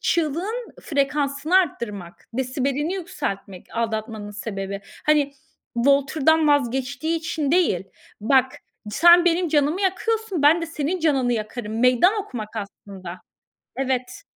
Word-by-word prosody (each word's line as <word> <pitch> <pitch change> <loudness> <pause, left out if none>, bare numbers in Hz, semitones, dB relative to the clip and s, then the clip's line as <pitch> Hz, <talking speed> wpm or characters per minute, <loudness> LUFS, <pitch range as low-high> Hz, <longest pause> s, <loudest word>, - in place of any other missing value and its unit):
çığlığın 355 - -1
frekansını 285 +3 0
arttırmak, 210 - -2
desibelini 270 +6 -1
yükseltmek, 200 - -5
aldatmanın 220 -2 -3
sebebi. 200 -2 -5 0.3
Hani, 295 -2 +3 0.4
Walter'dan 280 +5 +3
vazgeçtiği 280 +3 0
için 315 -3 -2
değil, 320 - +2 0.4
"Bak 260 +3 +3 0.4
sen 345 - +6
benim 350 0 +2
canımı 300 +3 +1
yakıyorsun, 400 -2 -1
ben 320 +4 +5
de - - -2
senin 325 +2 -2
canını 270 -6 +2
yakarım!" 220 0 -4
Meydan 250 - +5
okumak 225 - -7
aslında. 195 -3 -8 0.6
Evet. 260 -2 -2
280 Hz, 110 wpm, -23 LUFS, 230-325 Hz, 0.6 s, sen